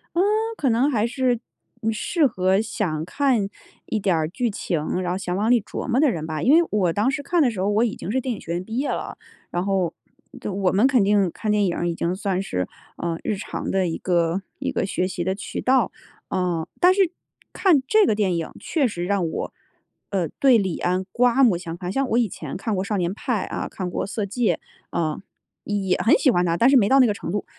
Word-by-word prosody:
嗯， 345 Hz, -, +3 dB, 0.4 s
可 275 Hz, -, +1 dB
能 240 Hz, +5 st, +3 dB
还 220 Hz, -4 st, +1 dB
是 250 Hz, -1 st, 0 dB, 0.5 s
适 295 Hz, +8 st, +1 dB
合 190 Hz, -2 st, +1 dB
想 175 Hz, -8 st, -2 dB
看 235 Hz, 0 st, +1 dB, 0.4 s
一 220 Hz, -, -1 dB
点 190 Hz, -3 st, +1 dB
儿 160 Hz, -1 st, 0 dB
剧 240 Hz, +6 st, -1 dB
情， 175 Hz, -4 st, -2 dB
然 175 Hz, -1 st, -2 dB
后 180 Hz, -, -1 dB
想 180 Hz, -2 st, -3 dB
往 210 Hz, +4 st, +1 dB
里 245 Hz, -, +6 dB
琢 -, -, -6 dB
磨 255 Hz, 0 st, +2 dB
的 300 Hz, -1 st, +5 dB
人 160 Hz, -6 st, -4 dB
吧。 155 Hz, -2 st, -3 dB
因 265 Hz, -, +4 dB
为 335 Hz, +1 st, +5 dB
我 185 Hz, -5 st, +2 dB
当 210 Hz, +7 st, +2 dB
时 280 Hz, +1 st, -2 dB
看 340 Hz, +4 st, +2 dB
的 270 Hz, -, +4 dB
时 210 Hz, -, -7 dB
候， 190 Hz, -, +1 dB
我 210 Hz, +3 st, +3 dB
已 225 Hz, -, 0 dB
经 195 Hz, -, -5 dB
是 260 Hz, +3 st, +1 dB
电 255 Hz, -1 st, -2 dB
影 -, -, -10 dB
学 170 Hz, -, -5 dB
院 175 Hz, +1 st, -2 dB
毕 225 Hz, +5 st, -5 dB
业 280 Hz, +2 st, 0 dB
了， -, -, -4 dB, 0.3 s
然 175 Hz, +1 st, -2 dB
后 190 Hz, -4 st, +1 dB, 0.5 s
就 210 Hz, -, -4 dB
我 190 Hz, -1 st, +1 dB
们 205 Hz, +6 st, +3 dB
肯 255 Hz, -6 st, +3 dB
定 200 Hz, -2 st, +3 dB
看 215 Hz, -, -4 dB
电 210 Hz, -1 st, +3 dB
影 175 Hz, -, 0 dB
儿 175 Hz, -, -1 dB
已 -, -, -1 dB
经 170 Hz, +2 st, -1 dB
算 190 Hz, -1 st, -1 dB
是， 90 Hz, -, -2 dB, 0.3 s
呃， 170 Hz, -1 st, -2 dB
日 215 Hz, -, -1 dB
常 195 Hz, -, -5 dB
的 190 Hz, -1 st, +1 dB
一 165 Hz, -, -2 dB
个 175 Hz, 0 st, +1 dB, 0.2 s
一 -, -, -2 dB
个 -, -, -1 dB
学 185 Hz, -1 st, -1 dB
习 185 Hz, -2 st, -3 dB
的 190 Hz, +2 st, 0 dB
渠 200 Hz, -, -6 dB
道。 255 Hz, -4 st, +2 dB, 0.4 s
嗯， 175 Hz, -3 st, -1 dB
但 360 Hz, +1 st, +6 dB
是 380 Hz, -3 st, +2 dB, 0.4 s
看 340 Hz, -9 st, +3 dB
这 430 Hz, +5 st, +5 dB
个 215 Hz, -, +2 dB
电 195 Hz, -4 st, +1 dB
影， 165 Hz, -, -4 dB
确 295 Hz, -6 st, 0 dB
实 175 Hz, -6 st, -4 dB
让 195 Hz, -2 st, 0 dB
我， 160 Hz, -, -4 dB, 0.6 s
呃， 185 Hz, -4 st, 0 dB
对 265 Hz, -4 st, +6 dB
李 190 Hz, -4 st, -1 dB
安 180 Hz, +1 st, 0 dB
刮 250 Hz, +2 st, +3 dB
目 215 Hz, -9 st, +5 dB
相 170 Hz, -2 st, -6 dB
看， 180 Hz, +1 st, -5 dB
像 270 Hz, +6 st, 0 dB
我 230 Hz, -, +2 dB
以 235 Hz, -5 st, +2 dB
前 155 Hz, -5 st, -7 dB
看 215 Hz, +2 st, -2 dB
过 185 Hz, -, -1 dB
《少 205 Hz, -1 st, 0 dB
年 175 Hz, -1 st, 0 dB
派》 220 Hz, -2 st, -2 dB
啊， -, -, -3 dB
看 185 Hz, -2 st, -4 dB
过 -, -, -2 dB
《色 215 Hz, -1 st, -2 dB
戒》。 230 Hz, +3 st, 0 dB, 0.4 s
嗯， 155 Hz, -1 st, -1 dB, 0.4 s
也 195 Hz, -3 st, 0 dB
很 255 Hz, +8 st, +5 dB
喜 270 Hz, -, +3 dB
欢 180 Hz, -5 st, +2 dB
他， 170 Hz, -1 st, +1 dB
但 235 Hz, +8 st, +5 dB
是 275 Hz, -, +5 dB
没 210 Hz, -6 st, +5 dB
到 270 Hz, -, +6 dB
那 255 Hz, -, +7 dB
个 210 Hz, -, +1 dB
程 185 Hz, -, -6 dB
度。 205 Hz, +1 st, -2 dB
200 Hz, 260 characters per minute, -23 LUFS, 180-245 Hz, 0.6 s, 那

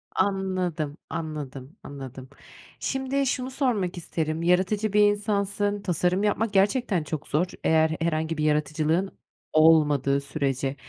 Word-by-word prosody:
Anladım, 185 Hz, -6 st, -1 dB
anladım, 150 Hz, -3 st, -6 dB
anladım. 135 Hz, -2 st, -9 dB, 0.5 s
Şimdi 270 Hz, +1 st, -1 dB
şunu 255 Hz, 0 st, -2 dB
sormak 220 Hz, -10 st, -1 dB
isterim; 160 Hz, -1 st, -3 dB
yaratıcı 190 Hz, +4 st, +1 dB
bir 210 Hz, -, +5 dB
insansın, 205 Hz, 0 st, +1 dB
tasarım 180 Hz, +1 st, 0 dB
yapmak 210 Hz, +1 st, 0 dB
gerçekten 200 Hz, -, +2 dB
çok 155 Hz, 0 st, -5 dB
zor, 155 Hz, +5 st, +1 dB, 0.2 s
eğer 160 Hz, 0 st, +3 dB
herhangi 160 Hz, -1 st, -1 dB
bir 150 Hz, -, -1 dB
yaratıcılığın 155 Hz, +4 st, 0 dB, 0.4 s
olmadığı 150 Hz, -3 st, +4 dB
sürece. 140 Hz, -1 st, -2 dB
170 Hz, 115 wpm, -26 LUFS, 150-205 Hz, 0.5 s, bir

